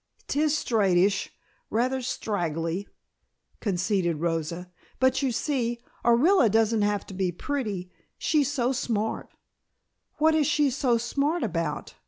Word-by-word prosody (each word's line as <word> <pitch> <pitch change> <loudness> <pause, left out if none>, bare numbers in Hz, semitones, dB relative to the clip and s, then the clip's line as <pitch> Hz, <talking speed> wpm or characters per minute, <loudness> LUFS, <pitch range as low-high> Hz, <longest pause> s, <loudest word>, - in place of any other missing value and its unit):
"'Tis 300 +1 +1
straightish, 195 -5 +2 0.4
rather 255 +4 +1
straggily," 175 -6 -2 0.7
conceded 185 -4 0
Rosa. 170 +2 -2 0.3
"But, 260 +1 +3
you 270 -2 +1
see, 240 -2 -1 0.2
Orilla 245 - +5
doesn't 225 +1 +2
have 205 0 0
to - - -10
be 185 -1 0
pretty, 200 - -4 0.3
she's 290 -3 +1
so 250 -3 +1
smart." 225 -4 -2 0.9
"What 315 +1 +4
is 310 -2 +3
she 295 -2 +2
so 250 -2 +2
smart 280 +8 0
about?" 165 -7 -3
225 Hz, 120 wpm, -26 LUFS, 185-265 Hz, 0.9 s, Orilla